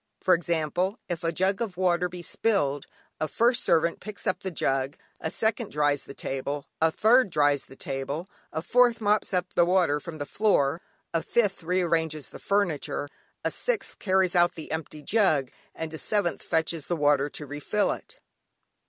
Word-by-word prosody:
For 185 - +4
example, 170 +4 0
if 170 -2 -4
a 165 - +1
jug 190 +4 0
of 205 -7 -3
water 180 -1 +2
be 175 0 -8
spilled, 145 -11 0 0.3
a 155 - 0
first 235 - +2
servant 170 0 +2
picks 210 +1 -8
up 185 - 0
the 190 - -4
jug, 135 -4 -1 0.2
a 160 - -2
second 220 +4 0
dries 145 -1 +1
the 140 - -10
table 140 +2 -4
cloth, 160 0 +2
a - - -31
third 235 +1 +5
dries 145 -4 +2
the 135 - -14
table, 140 +6 -4 0.2
a 160 +1 -3
fourth 245 0 +4
mops 210 -1 +1
up 180 -1 -1
the 175 - +5
water 175 -4 +3
from 160 +2 -8
the 145 - -4
floor, 165 -6 +1 0.3
a 165 - +2
fifth 205 -3 +1
rearranges 165 -3 0
the - - -11
furniture, 180 -7 -1 0.4
a - - +2
sixth - - -1
carries 190 -2 +2
out 175 0 +4
the 160 - -8
empty 155 -1 -5
jug, 155 - +2 0.2
and 160 -1 -5
a 160 - -3
seventh 205 -5 +1
fetches 160 -2 -1
the 175 - 0
water 145 -2 +3
to 150 - -5
refill 145 +9 0
it. - - -8
170 Hz, 180 wpm, -27 LUFS, 150-195 Hz, 0.4 s, third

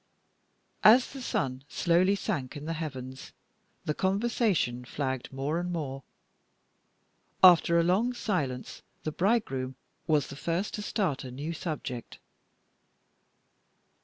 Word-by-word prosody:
As 245 +5 +7
the 270 - -7
sun 135 - -2
slowly 180 +3 +3
sank 150 - -3
in 145 - -8
the 165 - -2
heavens, 130 -5 -6 0.5
the 150 - 0
conversation 195 - +1
flagged 130 0 -3
more 140 +5 -1
and 175 0 -3
more. 140 -5 -4 1.4
After 170 -2 +7
a - - +4
long 200 +9 +2
silence, 145 - -2 0.2
the 155 - -2
bridegroom 150 - 0 0.3
was 150 -4 +3
the 140 - -7
first 170 +7 -2
to 210 - -3
start 195 - -1
a 130 - -6
new 145 +6 -5
subject. 150 -7 -5
160 Hz, 120 wpm, -29 LUFS, 135-190 Hz, 1.4 s, As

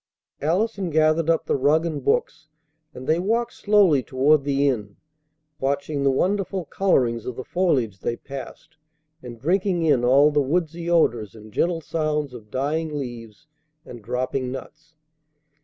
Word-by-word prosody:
Allison 190 +4 0
gathered 155 +1 +2
up 165 - +2
the - - 0
rug 145 +4 +2
and 150 -5 -3
books, 145 +2 0 0.4
and 130 -3 -10
they 160 +4 +2
walked 230 +6 0
slowly 200 -9 +3
toward 135 +4 +2
the 140 0 +2
inn, 105 -6 -2 0.6
watching 140 +2 -1
the 140 - +4
wonderful 190 +5 0
colorings 125 - +1
of 125 - -4
the 130 - -6
foliage 130 - 0
they 120 - -2
passed, 140 +4 -10 0.4
and 120 -2 -10
drinking 180 - +1
in 145 -6 +3
all 140 +4 +5
the 145 0 +2
woodsy 165 +3 -1
odors 115 - +1
and 110 -1 -13
gentle 170 +4 0
sounds 150 -3 -2
of 110 -4 -11
dying 150 +5 -2
leaves 120 0 -8 0.4
and 120 -2 -10
dropping 125 +3 -2
nuts. 155 +5 -10
145 Hz, 150 wpm, -23 LUFS, 130-165 Hz, 0.6 s, all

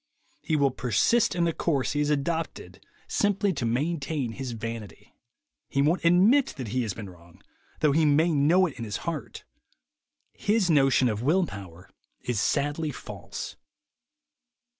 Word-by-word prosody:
He 155 - -1
will 140 -2 +3
persist 125 - +2
in 170 -1 +2
a 165 - 0
course 145 -6 0
he 145 - -1
has 150 0 +1
adopted 160 +3 -3 0.2
simply 205 -1 +1
to 125 -6 -2
maintain 140 0 -1
his 130 0 -5
vanity. 115 -2 -7 0.6
He 140 - +1
won't 160 +5 +1
admit 195 +11 +4
that 125 -5 -5
he 125 +4 0
has 110 -5 -3
been 110 -3 -7
wrong, 85 -2 -17 0.4
though 150 - +4
he 160 +3 +3
may 155 +3 +3
know 160 +6 +4
it 155 -9 -6
in - - -4
his 105 -3 -3
heart. - - -5 0.9
His 205 -4 +1
notion 135 -4 +4
of 110 -2 -2
will 170 +8 +2
power 95 - -10 0.4
is 120 -4 -1
sadly 145 +5 0
false. - - -8
145 Hz, 155 wpm, -27 LUFS, 115-165 Hz, 0.9 s, admit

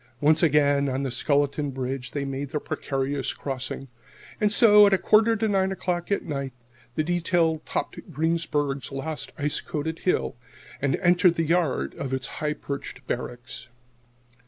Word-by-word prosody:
Once 155 +2 +4
again 145 -3 +3
on 130 +1 -1
the 135 - -2
skeleton 145 +2 +1
bridge 130 -1 -4
they 145 -1 -3
made 135 +1 -4
the 150 - -2
precarious 135 -1 -2
crossing. 135 0 -5 0.5
And 210 -1 +2
so, 210 -2 +7
at 200 - +4
a - - +1
quarter 220 +3 +4
to 220 0 0
nine 195 -2 +1
o'clock 180 -1 -2
at 200 - +1
night, 140 -4 -4 0.4
the 155 - +1
detail 170 -1 +1
topped - - -4
Greensburg's 150 -3 -1
last 145 +3 -4
ice 145 0 -1
coated 160 +2 -4
hill 185 - 0 0.5
and 140 -2 +2
entered 175 0 +4
the 165 - 0
yard 155 - +1
of 135 -1 -3
its 130 -1 -1 0.2
high 150 0 0
perched 140 -2 -7
Barracks. 125 0 -5
150 Hz, 160 wpm, -25 LUFS, 135-175 Hz, 0.5 s, so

